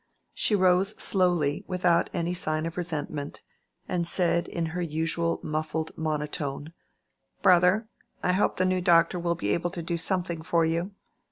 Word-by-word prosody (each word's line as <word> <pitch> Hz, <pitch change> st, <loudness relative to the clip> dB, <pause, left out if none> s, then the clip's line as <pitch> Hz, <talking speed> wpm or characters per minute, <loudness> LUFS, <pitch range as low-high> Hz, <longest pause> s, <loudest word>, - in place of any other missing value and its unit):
She 210 Hz, -, +1 dB
rose 185 Hz, +1 st, +3 dB
slowly 175 Hz, -7 st, +1 dB
without 180 Hz, -2 st, +2 dB
any 175 Hz, -1 st, -1 dB
sign 155 Hz, -2 st, -1 dB
of 165 Hz, 0 st, -5 dB
resentment, 150 Hz, -4 st, -4 dB, 0.4 s
and 170 Hz, -2 st, -1 dB
said 170 Hz, -1 st, +1 dB
in 170 Hz, -, -2 dB
her 180 Hz, -, -2 dB
usual 165 Hz, +1 st, -1 dB
muffled 155 Hz, +1 st, -3 dB
monotone, 150 Hz, -1 st, -3 dB, 0.7 s
"Brother, 185 Hz, +4 st, +5 dB, 0.4 s
I 180 Hz, -, +2 dB
hope 190 Hz, +3 st, +1 dB
the 185 Hz, -, +2 dB
new 185 Hz, 0 st, +1 dB
doctor 170 Hz, 0 st, +4 dB
will 170 Hz, 0 st, 0 dB
be 100 Hz, -, -3 dB
able 175 Hz, +1 st, -1 dB
to 170 Hz, 0 st, -6 dB
do 170 Hz, +1 st, -2 dB
something 175 Hz, -1 st, -1 dB
for 170 Hz, -1 st, +1 dB
you. 170 Hz, +4 st, -1 dB
170 Hz, 155 wpm, -27 LUFS, 160-180 Hz, 0.7 s, Brother